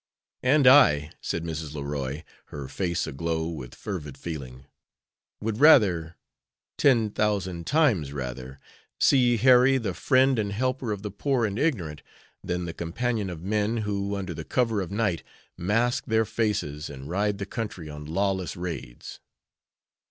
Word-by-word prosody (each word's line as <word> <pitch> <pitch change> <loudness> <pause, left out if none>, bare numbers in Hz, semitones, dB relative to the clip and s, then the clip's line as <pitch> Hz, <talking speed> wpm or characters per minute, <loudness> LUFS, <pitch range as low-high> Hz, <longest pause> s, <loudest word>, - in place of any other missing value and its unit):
"And 135 +2 +4
I," 75 - +6
said 85 - -3
Mrs. 80 -2 -5
Leroy, 70 0 -4 0.2
her 70 -2 -7
face 85 +1 -2
aglow 80 +2 -2
with 65 -7 -7
fervid 75 -9 -6
feeling, 70 -4 -7 0.8
"would 110 +1 -2
rather 95 - +5 0.6
ten 115 -7 +3
thousand 95 -5 -1
times 120 - +2
rather 65 -1 -6 0.4
see 125 -3 +4
Harry 130 +3 +6
the 110 -7 -2
friend 130 +4 +3
and 100 -1 -1
helper 130 +1 -1
of 100 -1 -4
the 105 - -4
poor 125 +4 0
and 105 0 -3
ignorant 85 - -1 0.4
than 90 0 -2
the 85 - -5
companion 105 +5 -2
of 85 -2 -7
men 105 +3 0
who, 100 0 -2
under 95 -3 -4
the 80 - -6
cover 115 +1 0
of 95 - -5
night, 100 -6 0 0.3
mask 115 +7 0
their 110 0 +2
faces 100 -10 -2
and 70 -1 -9
ride 100 +4 0
the 100 - -4
country 100 -6 -5
on 75 0 -8
lawless 95 +3 -1
raids." 85 -9 -7
95 Hz, 145 wpm, -26 LUFS, 80-115 Hz, 0.8 s, I